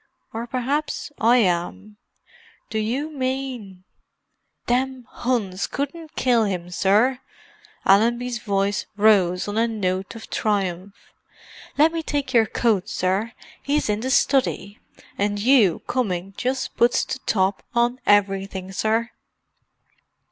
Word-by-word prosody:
"Or 230 +2 -4
perhaps 275 +5 -2
I 235 +3 +5
am. 200 +1 -1 0.7
Do 220 - -1
you 260 +8 -2
mean——" 255 -8 -4 0.8
"Them 255 0 -1 0.2
'Uns 200 -7 0
couldn't 305 +3 -5
kill 240 -3 +3
him, 180 -3 -4
sir!" 215 +8 +2 0.7
Allenby's 235 +4 +3
voice 200 -1 -1
rose 195 -4 +3
on 205 +2 -1
a 230 - +3
note 190 -3 -2
of 225 - -11
triumph. 195 -2 -1 0.8
"Let 310 +3 +5
me 330 - -1
take 285 -4 -3
your 225 -2 +5
coat, 210 -5 0
sir—'e's 220 +8 -2
in 210 - -1
the 255 +4 -3
study. 260 -6 +1 0.4
And 205 0 0
you 215 - +3
coming 195 -6 -2
just 260 +1 -2
puts 240 +1 +3
the - - -4
top 190 -1 +1
on 240 +1 +2
everything, 195 -2 +1
sir!" 220 +4 0
220 Hz, 120 wpm, -23 LUFS, 195-255 Hz, 0.8 s, I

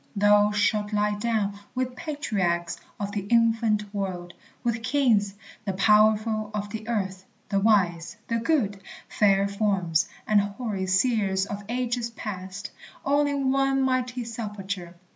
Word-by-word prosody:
Thou 205 0 +5
shalt 210 0 +1
lie 210 0 +2
down 205 -2 -1 0.2
With 255 0 -2
patriarchs 200 - -2 0.2
of 200 -1 -3
the 205 - -2
infant 225 -2 +2
world, 180 -3 -4 0.3
with 230 -1 0
kings, 225 -6 +2 0.3
The 195 -3 -2
powerful 215 +2 +3
of 205 0 -3
the 220 0 -6
earth, 190 -5 -2 0.3
the 200 - +2
wise, 190 -4 +2
the 230 - 0
good, 225 -7 0 0.3
Fair 200 -1 +3
forms, 195 -5 +1 0.2
and 210 -1 +4
hoary 200 -1 -3
seers 195 -1 +2
of 205 0 -6
ages 240 -1 -1
past, 200 -2 -6 0.3
All 285 +1 +3
in 280 -2 0
one 270 0 +2
mighty 255 -1 0
sepulchre. 200 -6 -5
210 Hz, 135 wpm, -26 LUFS, 195-235 Hz, 0.3 s, Thou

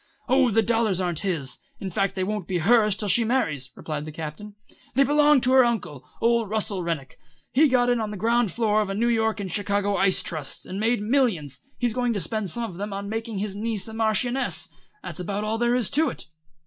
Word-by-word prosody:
"Oh, 260 0 +4
the 225 +1 +3
dollars 225 -5 +1
aren't 175 -3 -1
his. 165 -9 -2 0.2
In 190 -2 -5
fact 195 +2 0
they 190 - -1
won't 210 -2 -3
be 185 - -1
hers 210 +3 +4
till 210 - -3
she 205 +5 +5
marries," 165 - 0
replied 150 -1 -5
the 155 - -7
Captain. 160 +7 -7 0.4
"They 275 - +5
belong 295 0 +4
to 255 - +2
her 260 0 +7
uncle, 175 - -2
old 230 -2 +2
Russell 210 -3 -1
Rennick. 160 -6 -4 0.3
He 300 +5 +5
got 250 -2 +3
in 245 -1 +2
on 215 -1 -2
the 210 - -6
ground 230 0 +2
floor 215 +1 +2
of 210 - -1
the 195 - -3
New 235 +3 +1
York 220 -2 +1
and 190 -3 -4
Chicago 205 +1 0
ice 195 -1 +2
trusts, 155 -5 -5
and 190 - -5
made 225 0 +1
millions. 210 - 0 0.2
He's 240 -3 0
going 245 -1 0
to 205 - -1
spend 200 +3 -1
some 235 +8 -2
of 190 -7 -6
them 205 +1 -4
on 200 +1 -5
making 225 0 -4
his 200 0 -3
niece 215 -1 -2
a 220 - -8
Marchioness. 225 +4 0 0.3
That's - - -6
about 200 +3 -3
all 220 +1 -1
there 240 +1 +2
is 245 -5 0
to 310 +1 +2
it." - - -8
215 Hz, 225 wpm, -25 LUFS, 190-235 Hz, 0.4 s, her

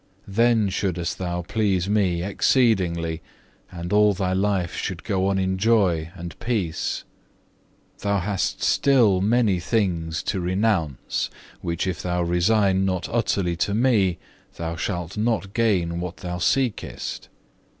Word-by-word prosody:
Then 115 +1 +3
shouldest 90 -3 -2
thou 90 -1 -2
please 95 -2 0
Me 95 -5 +1
exceedingly, 90 -7 +1 0.5
and 85 +1 -5
all 105 -1 +5
thy 95 0 -1
life 95 -2 0
should 95 -3 -4
go 95 -3 0
on 100 0 +1
in 95 0 0
joy 95 -7 +2
and 85 -1 -8
peace. 100 -10 -2 1.0
Thou 100 0 0
hast 95 0 -2
still 115 -9 +4
many 105 -2 +2
things 85 -5 -1
to 95 - -1
renounce, 90 - 0 0.3
which 85 +1 -2
if 90 -6 -2
thou 90 0 -1
resign 95 +3 +2
not 95 -2 -1
utterly 100 -6 0
to 100 +3 0
Me, 105 -7 +3 0.4
thou 85 0 -4
shalt 90 +1 -4
not 105 -3 0
gain 90 -7 +1
what 90 0 -5
thou 90 -1 -5
seekest. 120 +5 -1
95 Hz, 130 wpm, -24 LUFS, 85-105 Hz, 1.0 s, all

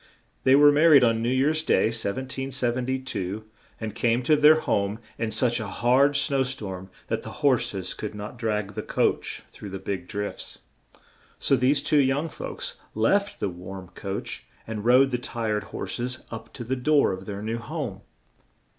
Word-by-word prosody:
They 130 - +7
were 145 +1 +8
mar 155 +3 +5
ried 140 -5 +8
on 115 -1 +3
New 115 - 0
Year's 145 +5 +2
Day, - - +3
1772, 125 -2 -2 0.3
and 110 -2 -4
came 120 +2 +1
to 155 +5 +4
their 150 +1 +6
home 100 -4 0 0.2
in 115 -1 -1
such 120 +2 +1
a 110 - -4
hard 125 +8 +3
snow 140 -1 +2
storm 100 -8 -4 0.2
that - - -2
the - - -10
hors 130 -7 +3
es 95 -1 -3
could 105 -1 -6
not 105 +4 -7
drag 105 -3 -1
the - - -3
coach - - -1
through 105 - -10
the 95 - -5
big 95 -2 -4
drifts, 105 -1 -5 0.8
so 135 - +3
these 135 +3 +2
two 150 0 +3
young 140 +4 +1
folks - - -5 0.2
left 200 - +1
the - - 0
warm 90 +1 -9
coach, 100 +1 -5 0.2
and 110 -1 -5
rode 130 +3 +5
the 125 - 0
tired 110 -4 -2
hors - - -5
es 125 +1 -3
up 115 -1 -8
to - - -6
the 125 +3 -1
door 145 +1 +3
of 95 0 -6
their 100 0 -5
new 115 +2 -2
home. 120 - -5
120 Hz, 180 wpm, -26 LUFS, 105-135 Hz, 0.8 s, were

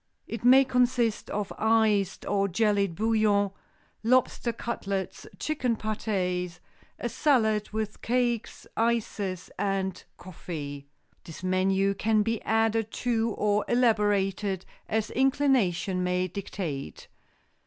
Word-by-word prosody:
It 230 - -6
may 260 +2 +7
consist 245 -3 +1
of 205 -1 -3
iced 220 -3 +2
or 200 -1 +1
jellied 200 -2 +1
bouillon, 215 -1 +2 0.5
lobster 240 +1 +2
cutlets, 200 -4 -4
chicken 260 -6 -1
pâtés, 185 -5 -2 0.4
a - - -3
salad, 220 -6 +2
with 215 -1 -4
cakes, 240 -1 -1
ices 210 -5 -1
and 190 -2 -1
coffee. 145 -6 -7 0.4
This 165 +2 -10
menu 190 +1 +2
can 215 +2 +2
be 225 0 -1
added 225 0 +1 0.2
to 230 -2 +2
or 210 0 +2
elaborated, 205 -5 +1 0.2
as 220 0 -1
inclination 255 -9 +2
may 180 0 0
dictate. 175 -6 -5
210 Hz, 105 wpm, -27 LUFS, 190-230 Hz, 0.5 s, may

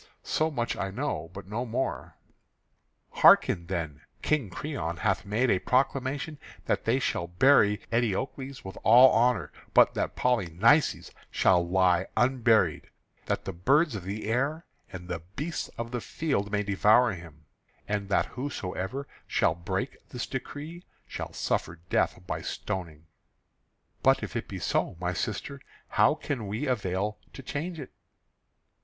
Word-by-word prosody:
So 155 +1 0
much 120 -6 -2
I 95 - -3
know, 95 - -3
but 100 +1 -9
no 110 +5 -3
more." 125 +2 -3 0.9
"Hearken 85 -2 +5
then. 80 -5 -4 0.2
King 145 -9 +1
Creon 90 - -4
hath 100 - 0
made 110 +5 +2
a 95 - +2
proclamation 135 - 0 0.3
that - - -1
they 115 +3 +3
shall 85 -9 -1
bury 105 +2 +4
Eteocles 130 +4 -2
with 95 - -8
all 125 +4 +8
honour; 115 -8 +2 0.2
but - - +6
that - - -2
Polynices 115 - +2 0.2
shall 90 -2 +3
lie 90 0 +2
unburied, 120 -2 +2 0.4
that - - -1
the 95 - -4
birds 140 - +3
of 100 -4 -5
the 100 +4 -5
air 140 +9 -1 0.3
and 90 -1 -8
the 85 -2 -3 0.2
beasts 160 +3 -3
of 115 0 -4
the 120 -1 -3
field 125 -11 -2
may 105 0 +1
devour 105 +4 +4
him; 80 -3 -12 0.4
and 100 -1 -2
that - - +2
whosoever 130 -1 -4 0.2
shall - - +2
break 95 +9 -4
this 125 - -4
decree 150 +6 -7 0.2
shall - - -6
suffer 85 - -2 0.2
death 90 - +1
by - - -3
stoning." 85 -6 -5 1.0
"But - - +4
if - - -6
it - - -3
be - - -6
so, - - -1
my 90 0 -1
sister, 130 +7 -4 0.3
how - - +4
can 120 -8 -4
we 110 +8 -3
avail 105 -4 -1
to 135 - -10
change 160 +6 -4
it?" 135 - -8
110 Hz, 145 wpm, -28 LUFS, 95-135 Hz, 1.0 s, all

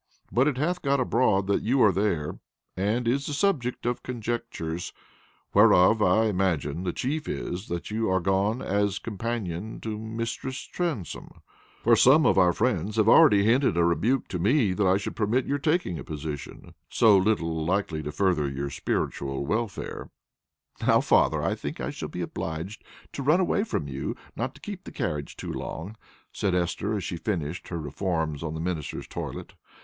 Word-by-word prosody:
But 130 +4 +3
it 145 -4 0
hath 175 +6 0
got 140 -1 +1
abroad 115 -6 +2
that 100 +1 +1
you 130 +5 +1
are 105 - +6
there, 90 -6 -1 0.4
and 110 +6 0
is 135 +4 +1
the 150 - -3
subject 140 -11 0
of 120 0 -1
conjectures, 115 -9 -4 0.6
whereof, 95 +5 +6
I 105 +3 +4
imagine, 90 -5 0
the 90 - 0
chief 150 - -3
is, 90 +4 -4
that 85 +3 -4
you 110 0 0
are 95 0 +2
gone 100 +6 0
as 100 0 0
companion 110 -3 -4
to 110 -1 -4
Mistress 115 +4 -4
Transome; 160 - -5 0.4
for 115 0 +6
some 135 +7 +6
of - - +4
our 90 -1 +5
friends 105 -1 0
have 110 -1 +3
already 115 -7 +7
hinted 120 -1 +3
a 85 - +4
rebuke 105 - +1
to 90 - -3
me 105 - +3
that 100 0 +1
I 95 +1 +4
should 100 - -5
permit 115 +4 +1
your 145 +1 -1
taking 155 - 0
a - - -6
position 75 -2 -7 0.2
so 110 -3 +5
little 85 -5 +1
likely 85 -2 -1
to 75 0 -5
further 85 -6 +1
your 70 +1 -4
spiritual 70 -1 -2
welfare." 110 +6 -3 0.7
"Now, - - +4
father, - - +3
I - - +1
think - - -6
I - - -3
shall - - -6
be 90 - -5
obliged 85 +4 -5 0.3
to - - -4
run 150 +6 +4
away 190 +2 +2
from 200 - -2
you, 70 0 -4 0.2
not - - -3
to - - -16
keep - - -7
the - - -9
carriage 75 -1 -3
too - - -5
long," 95 +7 -6 0.4
said 95 -3 0
Esther, 90 +4 -1
as 100 - -3
she 85 - -4
finished 85 -3 -3
her 85 - -4
reforms 80 -1 -2
on 80 -1 -4
the - - -4
minister's 80 -3 -4
toilet. - - -6
100 Hz, 180 wpm, -26 LUFS, 85-120 Hz, 0.7 s, already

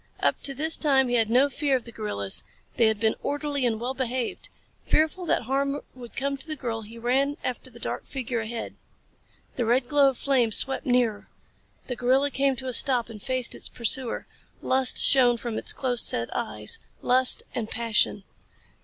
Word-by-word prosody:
Up - - 0
to 275 - -1
this 315 +4 +1
time 270 -4 +2
he 245 - 0
had 225 -2 +2
felt 225 - -3
no 270 +3 +5
fear 285 0 -1
of 250 - -2
the 235 - -10
gorillas. 100 - -2 0.3
They 230 - +3
had 220 -1 0
been 220 0 +2
orderly 285 -2 -2
and 220 -2 -2
well 245 +3 -3
behaved. 255 -2 -4 0.3
Fearful 320 +3 0
that - - +1
harm 275 +3 -1
would 245 -2 -13
come 275 +1 -2
to 275 - -7
the 310 - -4
girl 230 -5 -5
he 220 +2 -12
ran 270 +5 0
after 255 +1 -5
the 235 - -15
dark - - -5
figure 255 -3 -4
ahead. 225 +1 -6 0.8
The 245 - 0
red 245 +2 +1
glow 285 0 +4
of 260 - -6
flames 250 -6 +4
swept 270 0 -2
nearer. 245 -4 +1 0.6
The 250 - -5
gorilla 265 +4 +1
came 275 0 +1
to 260 +1 -7
a 255 - -3
stop 245 -2 +2
and 210 -2 -11
faced 255 +1 -1
its - - -4
pursuer. 240 +1 -2 0.4
Lust 260 -1 +4
shone 245 -3 +6
from 235 -1 -5
its - - +4
close 245 -3 +4
set 115 0 0
eyes 105 -1 -3 0.2
lust 255 +1 +5
and 225 -2 -4
passion. 225 -3 0
250 Hz, 195 wpm, -25 LUFS, 230-275 Hz, 0.8 s, shone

